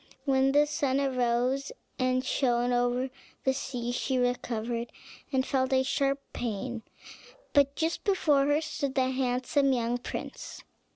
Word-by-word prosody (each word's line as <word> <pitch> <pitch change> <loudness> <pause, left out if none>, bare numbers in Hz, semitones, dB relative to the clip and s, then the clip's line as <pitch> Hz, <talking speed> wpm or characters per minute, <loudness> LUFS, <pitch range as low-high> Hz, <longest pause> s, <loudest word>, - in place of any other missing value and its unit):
When 270 -1 +3
the 290 +1 +5
sun 280 -2 0
arose 255 - +1 0.3
and 255 0 +1
shone 245 -2 +1
over 245 +2 +1 0.3
the 265 - +3
sea, 250 -3 -3
she 260 +1 -1
recovered, 240 -1 -1 0.4
and 260 -2 +1
felt 260 -1 0
a 260 0 +4
sharp 275 +1 +1
pain; 240 +1 -3 0.7
but 280 -1 +4
just 325 +1 -1
before 300 -9 +3
her 290 +2 +3
stood 290 -3 -3
the 260 -1 +2
handsome 260 +2 +1
young 240 0 0
prince. - - -7
260 Hz, 135 wpm, -29 LUFS, 245-275 Hz, 0.7 s, the